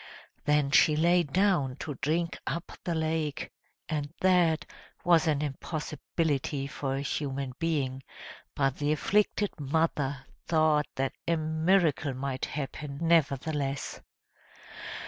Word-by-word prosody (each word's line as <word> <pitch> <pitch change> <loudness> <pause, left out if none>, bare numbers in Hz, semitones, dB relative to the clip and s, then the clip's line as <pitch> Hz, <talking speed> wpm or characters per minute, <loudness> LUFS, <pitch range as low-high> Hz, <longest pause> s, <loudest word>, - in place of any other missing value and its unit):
Then 150 -1 +3
she 150 +1 +6
lay 175 +3 +4
down 165 -4 +1
to 150 +2 -5
drink 165 +4 0
up 170 +1 -3
the 170 - 0
lake, 160 0 -1 0.4
and 145 -2 -2
that 175 -4 +4 0.4
was 170 -2 +4
an 150 -1 +2
impossibility 150 -1 -2
for 140 -1 -3
a 135 - -2
human 135 -2 -3
being, 140 -6 -1 0.5
but 135 -2 +1
the 145 0 0
afflicted 205 +5 +2
mother 145 -2 0 0.2
thought 155 -2 +3
that 135 0 -1
a 170 0 +2
miracle 160 -2 +2
might 130 0 -2
happen 140 0 -5
nevertheless. 145 -3 +1
150 Hz, 115 wpm, -29 LUFS, 140-165 Hz, 0.5 s, she